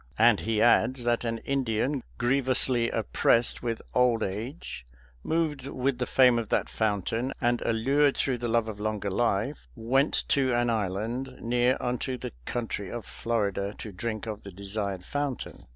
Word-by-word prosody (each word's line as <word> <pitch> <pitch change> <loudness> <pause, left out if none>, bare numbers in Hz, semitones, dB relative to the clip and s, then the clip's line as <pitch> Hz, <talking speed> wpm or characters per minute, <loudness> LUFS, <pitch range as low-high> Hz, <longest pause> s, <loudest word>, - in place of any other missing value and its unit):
And 115 -1 +5
he 110 -1 +1
adds 120 +1 +4
that 120 0 +1
an 115 0 -1
Indian 135 0 0 0.2
grievously 125 -1 +2
oppressed 115 +2 +2
with 115 -2 -3
old 125 -3 +3
age, 105 - -5 0.4
moved 155 -5 -1
with 130 -1 -1
the 125 - -1
fame 125 -3 +5
of 115 - -5
that - - +1
fountain, 110 +4 -1
and 120 -1 +1
allured 135 +5 +2
through 130 -3 0
the 120 - -2
love 115 -1 +1
of 105 -2 -6
longer 105 -1 -2
life, 115 +5 0
went 130 +5 +2
to 130 -3 +3
an 120 0 +2
island, 115 +5 -2
near 120 +2 +2
unto 125 +1 -2
the - - -6
country 115 -5 -3
of 120 -2 -6
Florida, 100 -3 -2
to 110 - -7
drink 110 +4 -4
of 110 -2 -5
the 100 - -9
desired 100 -1 -4
fountain 145 -3 -4
120 Hz, 160 wpm, -28 LUFS, 110-130 Hz, 0.4 s, And